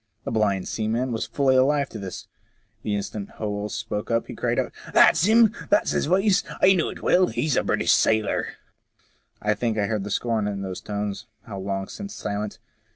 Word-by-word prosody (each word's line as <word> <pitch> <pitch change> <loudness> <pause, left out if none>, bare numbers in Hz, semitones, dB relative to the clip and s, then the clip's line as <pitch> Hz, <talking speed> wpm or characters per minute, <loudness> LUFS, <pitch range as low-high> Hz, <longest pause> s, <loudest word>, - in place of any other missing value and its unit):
The - - -4
blind 100 -4 +1
seaman 115 +4 -1
was 110 -2 -2
fully 130 +3 +2
alive 140 +2 +3
to 110 - -8
this; 95 -3 -7 0.5
the 105 - -2
instant 100 0 -5
Howell 105 -1 -3
spoke 105 0 -4 0.2
he - - -8
cried - - -1
out, - - 0 0.2
That's 160 - +6
him! 220 0 +5 0.2
That's 205 - +3
his - - 0
voice! 195 +3 +3 0.2
I 190 - +6
know 175 -4 +1
it - - -9
well. 185 0 +4
He 155 -5 -1
a - - +2
British - - +1
sailor! 110 -2 +2 0.5
" - - -40
I 105 0 +2
think 110 +1 -2
I 105 - +1
hear 110 +1 -1
the 100 +1 -5
scorn 110 0 0
in 100 -1 -3
those 95 -1 -5
tones, 105 -1 -4 0.2
how 100 -3 -7
long 95 0 -3
since 200 0 -8
silent 105 0 -4
110 Hz, 195 wpm, -24 LUFS, 100-140 Hz, 0.5 s, That's